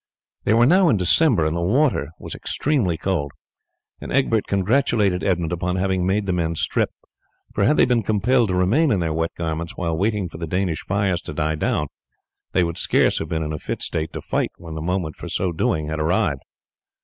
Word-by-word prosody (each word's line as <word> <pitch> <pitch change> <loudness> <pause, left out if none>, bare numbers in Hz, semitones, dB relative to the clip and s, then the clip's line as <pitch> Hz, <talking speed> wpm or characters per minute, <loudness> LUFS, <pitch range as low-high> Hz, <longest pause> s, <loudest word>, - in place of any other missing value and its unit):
They 110 - +3
were 120 +1 +5
now 180 +5 +5
in 110 - +3
December, 95 - +3
and 80 +1 0
the 85 - -1
water 115 - +2
was - - -8
extremely 120 - -1
cold, 80 -5 -1 0.7
and - - -8
Egbert 115 -5 +1
congratulated 100 -2 +1
Edmund 85 -4 0
upon 90 +1 -1
having 95 -1 0
made 100 +2 +1
the 95 - 0
men 85 -2 -1
strip, - - 0 0.6
for 100 - +1
had 150 - +3
they - - +6
been 125 -2 +2
compelled 115 +4 +2
to 90 - 0
remain 110 - +3
in 105 - +2
their 80 -2 -1
wet 80 +1 0
garments 85 0 -4
while 85 -3 -1
waiting 100 +1 0
for 80 - -10
the 85 - -4
Danish 90 -1 -1
fires 95 -3 0
to 75 - -8
die 80 0 0
down, 75 -1 0 0.7
they 90 - +2
would 85 0 -2
scarce - - +2
have 80 - -5
been 80 0 -1
in 75 0 -3
a 75 - -4
fit - - -4
state 80 0 -3
to - - -5
fight - - -1
when 85 -2 -9
the 80 - -5
moment 85 -3 -2
for - - -7
so 95 -2 -1
doing 80 -2 -1
had 80 0 -3
arrived. 75 -4 +1
90 Hz, 210 wpm, -22 LUFS, 80-105 Hz, 0.7 s, they